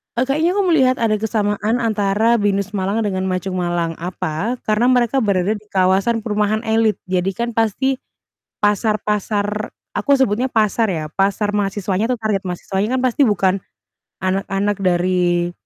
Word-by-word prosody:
eee, 245 - +2
kayaknya 310 +7 +1
aku 405 - +2
melihat 260 -5 +4
ada 215 -2 0
kesamaan 210 0 0
antara 220 +1 +2
Binus 200 -1 0
Malang 205 +2 -1
dengan 190 -2 -1
Ma 185 - 0
Chung 185 0 -4
Malang. 170 -2 -1
Apa? 180 +5 -3
Karena 215 +3 +2
mereka 250 +1 +3
berada 200 -4 +1
di 210 -1 -4
kawasan 195 +4 +1
perumahan 210 0 0
elite. 220 -1 +1
Jadi 185 +1 +1
kan 235 0 -2
pasti 230 +4 0 0.6
pasar-pasar 210 0 0 0.2
aku 285 - -1
sebutnya 255 0 +1
pasar 220 -1 +1
ya, 160 -4 -2
pasar 200 +1 0
mahasiswanya 205 +1 -1
atau 250 - 0
target 215 -3 -1
mahasiswanya 195 +6 -2
kan 255 - -1
pasti 255 +3 +1
bukan 190 -3 +2 0.7
anak-anak 195 +1 -1
dari 175 -1 +1
210 Hz, 150 wpm, -19 LUFS, 190-225 Hz, 0.7 s, melihat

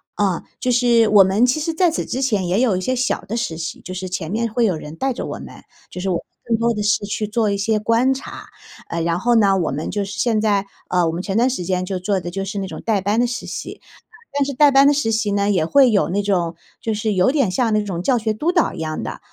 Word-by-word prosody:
啊。 195 -4 0 0.2
就 250 - 0
是 240 -2 +4
我 205 -2 +7
们 195 +5 +3
其 255 +5 +1
实 325 +1 -2
在 350 0 +3
此 315 - -3
之 260 +2 -2
前 210 -8 0
也 185 +4 +1
有 240 -6 +2
一 185 - -2
些 255 +6 -1
小 255 0 0
的 230 +4 -5
实 230 -9 -2
习， 165 0 -5
就 185 - -8
是 185 0 -5
前 180 -2 -4
面 230 +1 -1
会 235 +1 +2
有 190 -5 +1
人 155 0 -8
带 265 +7 -1
着 - - -5
我 - - -5
们， - - -11 0.3
就 180 - -6
是 190 - -2
我 180 - +1
们 - - -2 0.2
更 235 -2 +1
多 235 +1 +1
的 210 - -3
是 205 0 +1
去 210 +1 -3
做 215 0 0
一 200 - -1
些 215 +2 +1
观 230 +5 +2
察。 265 - -9 0.4
呃， 170 - -2
然 170 +1 0
后 240 +5 +2
呢， 200 -4 +4
我 165 - -1
们 150 +4 -4
就 205 +1 -1
是 195 0 -7
现 220 0 +1
在 205 -2 +1 0.2
呃， 180 -1 +2
我 - - 0
们 170 +2 -3
前 195 +2 -2
段 240 - +4
时 255 -8 -2
间 185 +1 -1
就 185 -1 -3
做 195 +1 0
的 175 -1 -6
就 195 +1 -3
是 200 +2 -5
那 195 - -2
种 - - -8
带 215 -3 +1
班 205 +4 0
的 245 - +3
实 240 - -5
习， - - -6 0.6
但 285 - +2
是 280 - -3
带 290 +2 +6
班 275 +1 +6
的 290 - +5
实 275 -6 0
习 220 -2 0
呢， 200 0 +1
也 180 -5 +2
会 260 - +5
有 200 - +2
那 200 +4 0
种 175 -4 0 0.3
就 225 - -1
是 210 0 -1
有 185 +2 +3
点 275 -10 +1
像 225 +4 +1
那 210 0 +2
种 185 -4 -4
教 250 +6 +2
学 220 -1 -1
督 300 +11 0
导 345 -3 +1
一 - - -8
样 155 -1 -3
的。 - - -6
210 Hz, 310 characters per minute, -20 LUFS, 185-240 Hz, 0.6 s, 我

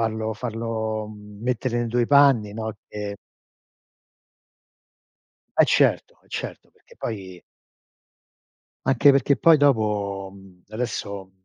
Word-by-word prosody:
Farlo 110 -1 -1
farlo 110 -1 -3
mettere 110 +4 -3
nei 120 - -2
tuoi 120 0 +1
panni, 140 -7 +5
no, 110 +1 -4
che 105 -1 -6 2.4
Eh - - +7
certo, - - +1
eh - - -28
certo, - - -6
perché - - -22
poi 95 -5 -6 1.4
anche 135 +2 +5
perché 140 0 +3
poi 165 -2 +6
dopo, 105 -8 +1
mhmm, 95 -2 -17
adesso 100 -4 -5
110 Hz, 105 wpm, -24 LUFS, 105-120 Hz, 2.4 s, Eh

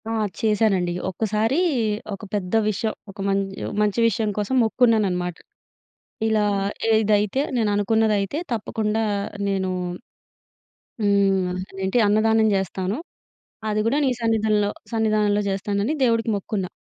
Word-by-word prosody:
ఆ! - - -2 0.3
చేశానండి. 210 -5 +2 0.2
ఒక్కసారీ 220 - 0 0.6
ఒక 195 - -8
పెద్ద 190 -2 -2
విషయం, 215 +1 -1 0.2
ఒక 200 +1 -12
మంచి 195 0 -1 0.3
మంచి 210 +1 +1
విషయం 220 0 0
కోసం 210 +5 -1
మొక్కుకున్నాననమాట. 210 -7 +2 0.9
ఇలా 215 -1 +2 0.5
ఏదైతే, 215 +2 +2 0.2
నేననుకున్నదైతే 210 +1 +1
తప్పకుండా 220 0 -1 0.4
నేనూ 190 -2 0 1.3
హ్మ్. 195 -2 +3 0.2
అదేంటి, 190 +4 -1
అన్నదానం 220 +1 +3
జేస్తాను. 190 +1 -1 0.7
అది 215 0 0
గూడా 260 +6 +2
నీ 265 - +3
సన్నిధంలో 215 -2 +2 0.2
సన్నిధానంలో 215 -2 +2
జేస్తానని 200 +6 -1
దేవుడికి 230 -2 +2
మొక్కుకున్నా. 195 -1 -3
210 Hz, 105 wpm, -23 LUFS, 195-220 Hz, 1.3 s, హ్మ్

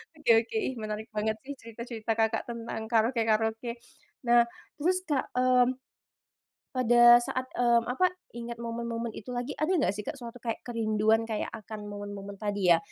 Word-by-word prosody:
oke, 300 -4 -4 0.2
oke 440 - -4 0.2
menarik 215 0 -5
banget 215 +1 0
sih 285 +1 -7
cerita-cerita 230 -1 -4
Kakak, 225 0 +1
tentang 230 -2 -5
karaoke 230 +1 +2
karaoke, 225 +2 0 0.5
nah 240 -1 +5 0.3
terus 365 +5 +1
Kak, 280 -3 -1
mmm, 250 0 +4 1.0
pada 240 -1 +7
saat 255 +1 -3
eee, 235 -1 +4
apa 315 +9 +2 0.3
ingat 235 0 -6
momen-momen 235 0 -3
itu 250 +4 -7
lagi, 245 +3 -4
ada 310 +5 +1
enggak 290 - +2
sih 210 - -5
Kak, - - -3
suatu 235 0 -8
kayak 230 -2 -4
kerinduan 220 -1 +1
kayak 220 -2 -2
akan 210 -1 -8
momen-momen 205 -1 -7
tadi 205 -3 0
ya? 170 - +8
230 Hz, 160 wpm, -29 LUFS, 220-245 Hz, 1.0 s, ya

